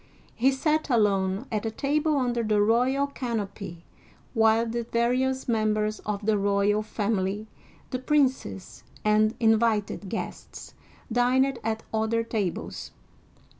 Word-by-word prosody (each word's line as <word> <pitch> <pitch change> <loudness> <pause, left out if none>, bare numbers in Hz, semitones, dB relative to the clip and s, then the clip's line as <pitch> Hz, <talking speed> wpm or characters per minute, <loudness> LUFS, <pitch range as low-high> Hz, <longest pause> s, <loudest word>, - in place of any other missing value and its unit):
He 255 +3 +3
sat 305 +3 0
alone 200 -2 +2
at 215 -2 -1
a 225 - -1
table 295 +6 0
under 245 -3 0
the 215 -2 +1
royal 250 +6 +3
canopy, 205 -9 -5 0.5
while 225 0 +4
the 235 +1 -2
various 250 +3 0
members 215 -2 0
of 205 -1 -3
the 215 -1 +2
royal 200 +1 +2
family, 210 -1 -2 0.5
the 255 - -2
princes 260 - 0 0.2
and 215 +1 +3
invited 220 -3 +1
guests, 225 - -6 0.4
dined 255 +2 +2
at 220 0 -2
other 220 +1 +1
tables. 210 -6 -3
225 Hz, 120 wpm, -26 LUFS, 210-250 Hz, 0.5 s, while